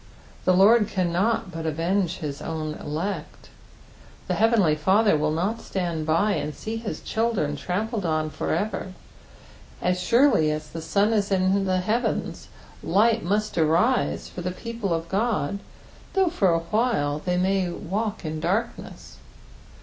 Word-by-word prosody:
The 185 Hz, -, +4 dB
Lord 210 Hz, +3 st, +6 dB
cannot 185 Hz, +2 st, 0 dB
but 165 Hz, -2 st, -4 dB
avenge 175 Hz, +3 st, 0 dB
his 150 Hz, -4 st, -5 dB
own 155 Hz, -1 st, -3 dB
elect. 165 Hz, +3 st, -5 dB, 0.8 s
The -, -, 0 dB
heavenly 220 Hz, -8 st, +3 dB
Father 190 Hz, +6 st, +3 dB
will 150 Hz, 0 st, +1 dB
not 190 Hz, +9 st, -1 dB
stand 170 Hz, -4 st, -3 dB
by 165 Hz, +7 st, +2 dB
and 150 Hz, -6 st, -2 dB
see 220 Hz, +1 st, -5 dB
his 225 Hz, -1 st, -5 dB
children 220 Hz, -10 st, -1 dB
trampled 200 Hz, -, -2 dB
on 155 Hz, -2 st, 0 dB
for -, -, -3 dB
ever; 190 Hz, -2 st, -2 dB, 0.9 s
as 180 Hz, 0 st, 0 dB
surely 230 Hz, -, +4 dB
as 155 Hz, 0 st, -3 dB
the 165 Hz, -, -6 dB
sun 205 Hz, +6 st, +2 dB
is 205 Hz, -2 st, 0 dB
in 190 Hz, +1 st, +2 dB
the 185 Hz, -1 st, +1 dB
heavens, 220 Hz, +6 st, -1 dB, 0.3 s
light 225 Hz, +2 st, +3 dB
must 210 Hz, +1 st, 0 dB
arise 165 Hz, +11 st, +2 dB
for 180 Hz, -, -8 dB
the 180 Hz, -, -2 dB
people 230 Hz, +1 st, -4 dB
of 165 Hz, 0 st, -1 dB
Qod, 200 Hz, -4 st, 0 dB, 0.5 s
though 385 Hz, -2 st, +3 dB
for 200 Hz, -, +2 dB
awhile 165 Hz, -3 st, +1 dB
they 180 Hz, 0 st, 0 dB
may 190 Hz, 0 st, +1 dB
walk 205 Hz, +4 st, -3 dB
in 155 Hz, 0 st, -3 dB
darkness. 200 Hz, +9 st, -3 dB
185 Hz, 145 wpm, -25 LUFS, 165-215 Hz, 0.9 s, Lord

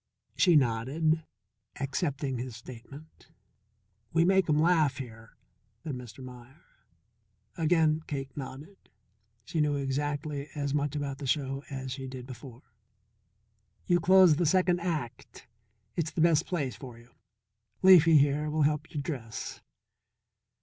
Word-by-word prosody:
She 175 Hz, -3 st, +4 dB
nodded, 145 Hz, +5 st, +1 dB, 0.6 s
accepting 135 Hz, -2 st, -2 dB
his 125 Hz, -1 st, -6 dB
statement. 130 Hz, +6 st, -13 dB, 0.8 s
"We 165 Hz, +1 st, +3 dB
make 190 Hz, -2 st, +3 dB
'em 150 Hz, -, +3 dB
laugh 155 Hz, -4 st, +3 dB
here," 115 Hz, -4 st, -10 dB, 0.5 s
said 155 Hz, -, -4 dB
Mr. 125 Hz, 0 st, -9 dB
Meier. 125 Hz, +4 st, -13 dB, 0.9 s
Again 160 Hz, -1 st, +2 dB
Cake 135 Hz, -2 st, -5 dB
nodded; 145 Hz, +7 st, -8 dB, 0.7 s
she 160 Hz, -, -1 dB
knew 150 Hz, -1 st, +1 dB
exactly 145 Hz, +1 st, -3 dB
as 140 Hz, -1 st, -2 dB
much 145 Hz, 0 st, -1 dB
about 140 Hz, -2 st, -4 dB
the 140 Hz, -, -5 dB
show 135 Hz, 0 st, -1 dB
as 130 Hz, -1 st, -5 dB
she 130 Hz, 0 st, -5 dB
did 130 Hz, -1 st, -8 dB
before. 130 Hz, -1 st, -11 dB, 1.2 s
"You 175 Hz, 0 st, +3 dB
close 180 Hz, -2 st, +6 dB
the 175 Hz, -, +1 dB
second 180 Hz, +1 st, +3 dB
act; 155 Hz, -9 st, -5 dB, 0.5 s
it's 165 Hz, -2 st, -1 dB
the -, -, -6 dB
best 165 Hz, -2 st, +3 dB
place 140 Hz, -, -2 dB
for 120 Hz, +1 st, -10 dB
you. 120 Hz, +1 st, -18 dB, 0.7 s
Leafy, 165 Hz, -4 st, +8 dB
here, 145 Hz, +1 st, +2 dB
will 155 Hz, 0 st, +1 dB
help 150 Hz, +1 st, 0 dB
you 150 Hz, -, -4 dB
dress." 130 Hz, -7 st, -6 dB
145 Hz, 130 wpm, -29 LUFS, 130-160 Hz, 1.2 s, Leafy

